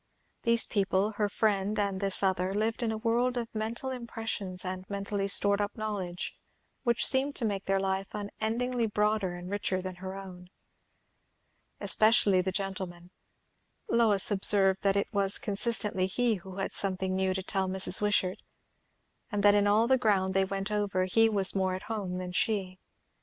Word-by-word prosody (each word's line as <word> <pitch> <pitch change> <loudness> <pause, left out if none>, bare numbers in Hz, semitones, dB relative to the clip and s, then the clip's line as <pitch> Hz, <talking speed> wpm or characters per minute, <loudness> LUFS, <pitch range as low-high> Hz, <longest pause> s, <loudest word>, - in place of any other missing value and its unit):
These 235 0 +3
people, 200 0 0
her 210 -1 0
friend 210 -1 0
and 200 -2 -1
this 195 0 0
other, 190 0 0
lived 220 +3 -1
in 230 -2 0
a 220 - -3
world 240 +3 0
of 235 -1 -4
mental 230 +4 -3
impressions 225 -6 -4
and 185 0 -4
mentally 200 0 -3
stored 200 0 +4
up 205 +2 -3
knowledge, 200 -5 -4 0.5
which 235 -2 +1
seemed 275 +1 +1
to 235 - -1
make 200 -2 -2
their 195 0 +1
life 190 0 -2
unendingly 225 +4 -2
broader 210 -3 0
and 175 0 -8
richer 190 -1 -2
than 185 -1 -6
her 190 +1 -7
own. 185 -2 -10 1.3
Especially 215 -4 +4
the 190 +1 -2
gentleman. 185 -3 -5 0.8
Lois 220 -4 +3
observed 195 -1 +4
that 195 -1 +2
it 200 +3 -1
was 200 0 +1
constantly 205 -2 0
he 240 +4 +1
who 190 +1 -11
had 195 0 -3
something 190 -1 -1
new 190 0 0
to 190 - -3
tell 190 0 -1
Mrs. 190 +2 +4
Wishart, 200 -3 +1 0.9
and 205 -2 -1
that 205 0 +7
in 205 0 +3
all 215 +3 +4
the 260 +1 +3
ground 195 -5 +1
they 195 0 +3
went 195 +1 -4
over, 205 -3 0
he 225 +4 +3
was 200 -3 +3
more 190 -1 0
at 190 - -7
home 205 -5 -4
than 180 -1 -5
she. 185 -1 -1
200 Hz, 170 wpm, -29 LUFS, 190-220 Hz, 1.3 s, that